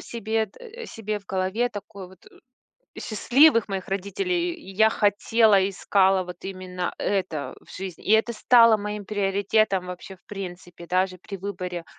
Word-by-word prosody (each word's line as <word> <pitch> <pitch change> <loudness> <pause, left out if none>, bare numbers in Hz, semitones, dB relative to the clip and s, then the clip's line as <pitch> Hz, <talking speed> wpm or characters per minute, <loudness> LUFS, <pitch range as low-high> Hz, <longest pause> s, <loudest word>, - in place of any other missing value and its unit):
себе 220 -1 -2
д 465 - -11
себе 215 -2 -4
в 200 - -24
голове 190 +6 0
такой 200 -3 -9
вот 185 - -17 0.8
счастливых 240 +2 +4
моих 195 -2 -4
родителей, 345 - -1
и 315 - -12
я 220 +3 +5
хотела, 205 -1 +3
искала 195 -1 +2
вот 180 -1 -10
именно 185 -2 -5
это 185 -7 -2
в - - -20
жизни. 185 -3 -7
И - - -3
это 220 +2 +3
стало 230 -1 +5
моим 210 0 -5
приоритетом 200 -1 +1
вообще 180 +2 -8
в - - -37
принципе 180 -3 -8
даже 185 +1 0
при 195 +2 -8
выборе, 180 -3 -5
200 Hz, 150 wpm, -25 LUFS, 185-220 Hz, 0.8 s, я